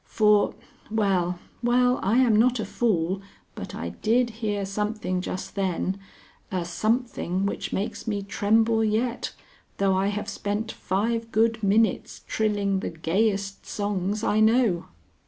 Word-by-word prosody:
For 210 Hz, -1 st, +3 dB, 0.3 s
Well, 190 Hz, -5 st, +1 dB, 0.2 s
well, 245 Hz, +1 st, +3 dB
I 215 Hz, +5 st, +2 dB
am 245 Hz, -4 st, +5 dB
not 240 Hz, +3 st, +4 dB
a 215 Hz, -, -1 dB
fool, 195 Hz, -4 st, 0 dB, 0.3 s
but -, -, -7 dB
I -, -, -4 dB
did 235 Hz, +2 st, +1 dB
hear 210 Hz, -3 st, -2 dB
something 205 Hz, -2 st, -2 dB
just 185 Hz, -, -5 dB
then, 190 Hz, 0 st, -1 dB, 0.5 s
a 180 Hz, -2 st, -1 dB
something 215 Hz, -1 st, -1 dB
which 200 Hz, -, -3 dB
makes 205 Hz, +4 st, -3 dB
me 205 Hz, -2 st, -1 dB
tremble 220 Hz, +3 st, +2 dB
yet, 230 Hz, +3 st, 0 dB, 0.5 s
though 195 Hz, -1 st, +2 dB
I 190 Hz, +1 st, +2 dB
have 205 Hz, +1 st, -2 dB
spent 210 Hz, +2 st, -3 dB
five 230 Hz, +4 st, -1 dB
good 225 Hz, +1 st, +2 dB
minutes 215 Hz, +2 st, +1 dB
trilling 205 Hz, -3 st, 0 dB
the -, -, -3 dB
gayest 195 Hz, +4 st, -1 dB
songs 205 Hz, 0 st, -2 dB
I 215 Hz, -, +2 dB
know. 220 Hz, -5 st, +3 dB
210 Hz, 140 wpm, -26 LUFS, 195-225 Hz, 0.5 s, am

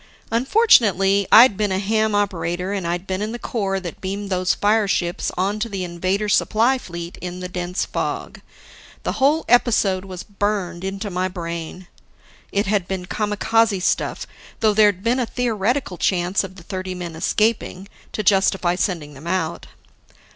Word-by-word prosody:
Unfortunately, 215 Hz, -, +4 dB
I'd 230 Hz, -2 st, +8 dB
been 210 Hz, 0 st, 0 dB
a 190 Hz, -, +1 dB
ham 215 Hz, +2 st, +1 dB
operator 180 Hz, -2 st, -1 dB
and 190 Hz, -4 st, -2 dB
I'd 175 Hz, +2 st, -2 dB
been 190 Hz, 0 st, -3 dB
in 215 Hz, +2 st, -3 dB
the -, -, -4 dB
corps 195 Hz, -5 st, -2 dB
that 175 Hz, -3 st, -8 dB
beamed 195 Hz, +1 st, -4 dB
those 185 Hz, 0 st, +1 dB
fireships 205 Hz, -4 st, +1 dB
onto 205 Hz, +5 st, -1 dB
the 195 Hz, -3 st, -3 dB
Invader 185 Hz, +4 st, -1 dB
supply 230 Hz, +5 st, +2 dB
fleet 170 Hz, -4 st, -8 dB
in 180 Hz, 0 st, -6 dB
the 180 Hz, -, -5 dB
dense 180 Hz, 0 st, -3 dB
fog. -, -, -4 dB, 0.6 s
The -, -, -1 dB
whole 300 Hz, +4 st, +3 dB
episode 210 Hz, -6 st, +3 dB
was 185 Hz, -2 st, -7 dB
burned 200 Hz, -3 st, -2 dB
into 195 Hz, +2 st, -4 dB
my 185 Hz, +1 st, 0 dB
brain. 170 Hz, 0 st, -6 dB, 0.7 s
It 200 Hz, +1 st, 0 dB
had 195 Hz, -2 st, 0 dB
been 190 Hz, -2 st, -4 dB
kamikaze 210 Hz, 0 st, +1 dB
stuff, -, -, 0 dB, 0.3 s
though 215 Hz, -2 st, +3 dB
there'd 205 Hz, -3 st, +3 dB
been 245 Hz, +3 st, +1 dB
a 245 Hz, -, 0 dB
theoretical 235 Hz, -, -1 dB
chance 180 Hz, +1 st, +1 dB
of 190 Hz, -1 st, -8 dB
the 175 Hz, -, -13 dB
thirty 185 Hz, 0 st, -5 dB
men 175 Hz, -2 st, -6 dB
escaping, 200 Hz, +2 st, 0 dB, 0.3 s
to 215 Hz, -, -2 dB
justify 190 Hz, -2 st, +3 dB
sending 170 Hz, -5 st, -2 dB
them 140 Hz, +4 st, -11 dB
out. 170 Hz, -3 st, -2 dB
195 Hz, 160 wpm, -21 LUFS, 180-215 Hz, 0.7 s, I'd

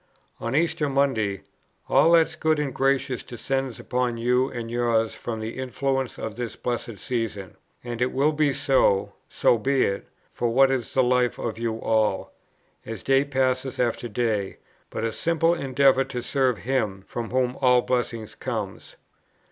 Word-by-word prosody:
On 115 Hz, +3 st, -3 dB
Easter 155 Hz, -2 st, +1 dB
Monday: 125 Hz, -8 st, 0 dB, 0.4 s
"All 165 Hz, -, +5 dB
that 165 Hz, -1 st, +6 dB
is -, -, -11 dB
good 160 Hz, -1 st, +1 dB
and 145 Hz, -3 st, -2 dB
gracious 135 Hz, -1 st, +1 dB
descend 135 Hz, +1 st, -3 dB
upon 125 Hz, -1 st, -1 dB
you 125 Hz, +3 st, +2 dB
and 115 Hz, -1 st, -6 dB
yours 115 Hz, -2 st, +1 dB
from 115 Hz, -2 st, -5 dB
the 110 Hz, +3 st, -5 dB
influences 130 Hz, 0 st, -2 dB
of 110 Hz, -1 st, -5 dB
this 120 Hz, -1 st, -4 dB
Blessed 120 Hz, -3 st, -4 dB
Season; 110 Hz, -7 st, -4 dB, 0.3 s
and 120 Hz, -1 st, -5 dB
it 125 Hz, -, +2 dB
will 140 Hz, +3 st, +2 dB
be 150 Hz, -1 st, +2 dB
so, 105 Hz, -8 st, +2 dB, 0.2 s
(so 120 Hz, -, +3 dB
be 135 Hz, +4 st, +2 dB
it!) 100 Hz, -, -2 dB, 0.3 s
for 120 Hz, -, 0 dB
what 135 Hz, +3 st, +5 dB
is 125 Hz, -4 st, -2 dB
the 130 Hz, -, +5 dB
life 125 Hz, 0 st, +2 dB
of 115 Hz, -1 st, -4 dB
you 115 Hz, -1 st, -2 dB
all, 110 Hz, -4 st, 0 dB, 0.5 s
as 110 Hz, -3 st, -7 dB
day 135 Hz, 0 st, +4 dB
passes 130 Hz, -1 st, -1 dB
after 120 Hz, 0 st, 0 dB
day, 105 Hz, -3 st, -1 dB, 0.3 s
but -, -, -4 dB
a 115 Hz, -1 st, -1 dB
simple 165 Hz, +4 st, +2 dB
endeavour 135 Hz, -3 st, +3 dB
to 130 Hz, -2 st, -5 dB
serve 130 Hz, -3 st, +1 dB
Him, 110 Hz, -7 st, -1 dB
from 120 Hz, -2 st, -5 dB
whom 125 Hz, 0 st, 0 dB
all 125 Hz, -2 st, +5 dB
blessing 120 Hz, -3 st, -1 dB
comes? 110 Hz, -6 st, -5 dB
125 Hz, 165 wpm, -25 LUFS, 115-135 Hz, 0.5 s, that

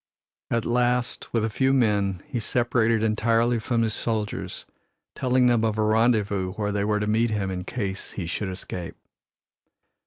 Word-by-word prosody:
At 115 Hz, -1 st, 0 dB
last, 125 Hz, +1 st, 0 dB
with 115 Hz, -2 st, +1 dB
a -, -, -1 dB
few 135 Hz, +5 st, +2 dB
men, 100 Hz, -7 st, +1 dB
he 130 Hz, -5 st, -3 dB
separated 115 Hz, -1 st, +1 dB
entirely 115 Hz, +2 st, +2 dB
from 115 Hz, +1 st, 0 dB
his 110 Hz, -1 st, 0 dB
soldiers, 110 Hz, -2 st, -3 dB, 0.5 s
telling 130 Hz, 0 st, +2 dB
them 120 Hz, -2 st, +3 dB
of 110 Hz, -1 st, 0 dB
a 110 Hz, -, +2 dB
rendezvous 105 Hz, -4 st, +2 dB
where 105 Hz, 0 st, -2 dB
they 100 Hz, 0 st, 0 dB
were 105 Hz, 0 st, +1 dB
to 105 Hz, -, -1 dB
meet 110 Hz, +2 st, +2 dB
him 100 Hz, -3 st, -1 dB
in 90 Hz, -1 st, -4 dB
case 100 Hz, -5 st, -4 dB
he 95 Hz, -, -4 dB
should 95 Hz, +4 st, -3 dB
escape. 90 Hz, -2 st, -6 dB
110 Hz, 165 wpm, -25 LUFS, 105-120 Hz, 0.5 s, them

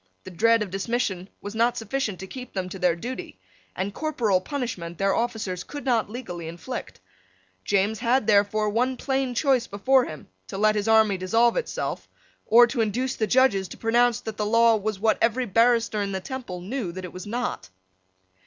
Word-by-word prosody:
The 185 Hz, -, -9 dB
dread 230 Hz, +5 st, +3 dB
of 195 Hz, -, -8 dB
dismission 195 Hz, -2 st, -2 dB
was 205 Hz, +1 st, -6 dB
not 235 Hz, +2 st, +1 dB
sufficient 225 Hz, -3 st, -3 dB
to -, -, -5 dB
keep 250 Hz, +5 st, -9 dB
them 185 Hz, -1 st, -2 dB
to 190 Hz, -, -8 dB
their 180 Hz, -2 st, +2 dB
duty: 245 Hz, +9 st, -7 dB, 0.4 s
and 195 Hz, +2 st, -3 dB
corporal 230 Hz, -12 st, 0 dB
punishment 185 Hz, -, -4 dB
their 195 Hz, 0 st, +2 dB
officers 220 Hz, -6 st, -2 dB
could 290 Hz, -1 st, -8 dB
not 235 Hz, -6 st, +1 dB
legally 180 Hz, -8 st, -6 dB
inflict. 165 Hz, 0 st, -7 dB, 0.7 s
James 205 Hz, +2 st, +1 dB
had 245 Hz, 0 st, +2 dB
therefore 210 Hz, 0 st, +3 dB
one 250 Hz, +4 st, 0 dB
plain 265 Hz, -2 st, -1 dB
choice 260 Hz, -2 st, +2 dB
before 255 Hz, +6 st, +3 dB
him, 155 Hz, -, -9 dB, 0.2 s
to -, -, -6 dB
let 215 Hz, +1 st, +4 dB
his 210 Hz, 0 st, -2 dB
army 220 Hz, -3 st, +4 dB
dissolve 225 Hz, +6 st, +2 dB
itself, -, -, -3 dB, 0.4 s
or 235 Hz, +2 st, +8 dB
to 235 Hz, 0 st, -2 dB
induce 245 Hz, +4 st, -1 dB
the 220 Hz, -, -1 dB
judges 210 Hz, -5 st, +3 dB
to -, -, -10 dB
pronounce 240 Hz, +1 st, +2 dB
that 220 Hz, -1 st, -6 dB
the 210 Hz, -, -1 dB
law 230 Hz, +1 st, +5 dB
was 215 Hz, -1 st, -3 dB
what 220 Hz, +1 st, +2 dB
every 235 Hz, +3 st, +2 dB
barrister 230 Hz, 0 st, +2 dB
in 200 Hz, -1 st, -2 dB
the 190 Hz, -, -1 dB
Temple 190 Hz, -5 st, -6 dB
knew 205 Hz, 0 st, -4 dB
that 185 Hz, +1 st, -7 dB
it 180 Hz, -, -9 dB
was 185 Hz, +2 st, -8 dB
not. 235 Hz, -, -3 dB
220 Hz, 190 wpm, -25 LUFS, 195-245 Hz, 0.7 s, or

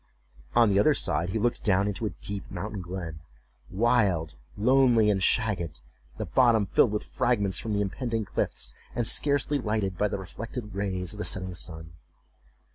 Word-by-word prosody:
On 120 Hz, -2 st, +6 dB
the 100 Hz, -, +3 dB
other 150 Hz, +8 st, +4 dB
side 85 Hz, -, +1 dB
he 95 Hz, -, -1 dB
looked 120 Hz, +2 st, 0 dB
down 100 Hz, -1 st, +2 dB
into 105 Hz, +2 st, -2 dB
a -, -, -7 dB
deep 100 Hz, -1 st, -4 dB
mountain 105 Hz, -2 st, -5 dB
glen, 90 Hz, -3 st, -6 dB, 0.5 s
wild, 100 Hz, -, +1 dB, 0.2 s
lonely, 120 Hz, -1 st, +4 dB
and 95 Hz, -1 st, 0 dB
shagged, 95 Hz, -6 st, 0 dB, 0.4 s
the -, -, -3 dB
bottom 120 Hz, -5 st, +3 dB
filled 105 Hz, -, +3 dB
with 105 Hz, -, -2 dB
fragments 100 Hz, -7 st, 0 dB
from 110 Hz, -, -3 dB
the 100 Hz, -, +1 dB
impending 115 Hz, +2 st, -2 dB
cliffs, -, -, -1 dB, 0.2 s
and 120 Hz, -, 0 dB
scarcely 145 Hz, +3 st, +3 dB
lighted 105 Hz, -6 st, -2 dB
by 105 Hz, -, +3 dB
the 100 Hz, -, -3 dB
reflected 105 Hz, +4 st, -7 dB
rays 95 Hz, -3 st, -2 dB
of 105 Hz, -, -10 dB
the -, -, -2 dB
setting 95 Hz, -1 st, -2 dB
sun. 80 Hz, -2 st, -6 dB
105 Hz, 170 wpm, -27 LUFS, 95-115 Hz, 0.5 s, On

